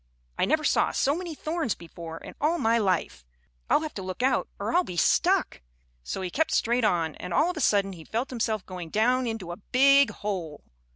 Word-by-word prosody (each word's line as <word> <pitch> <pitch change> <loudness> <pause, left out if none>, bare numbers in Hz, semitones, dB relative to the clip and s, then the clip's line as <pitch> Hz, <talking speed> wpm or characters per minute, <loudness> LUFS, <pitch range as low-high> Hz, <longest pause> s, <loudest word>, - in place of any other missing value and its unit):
"I - - +1
never 310 +3 +1
saw - - +2
so 280 - +1
many 345 -2 -5
thorns 310 - -2
before 165 -1 -9
in - - -10
all 315 +4 +2
my 230 -5 +2
life. 185 - -1 0.5
I'll - - +4
have 310 - -5
to 195 - -6
look 185 +5 -5
out 260 -1 +2
or - - -3
I'll 355 +1 +4
be 180 - -7
stuck." - - +2 0.4
So 130 - -4
he 180 - -4
kept 320 - +1
straight 240 +1 +1
on, 165 -6 +1
and 180 -1 -5
all 350 - +3
of 355 - -10
a - - -2
sudden 200 -4 +2
he 165 -3 -11
felt 235 - -3
himself 220 -5 -2
going 180 -3 -7
down 245 +6 +2
into 220 -6 -4
a 175 - -6
big 275 +6 +4
hole. 180 -8 -5
225 Hz, 215 wpm, -27 LUFS, 180-275 Hz, 0.5 s, I'll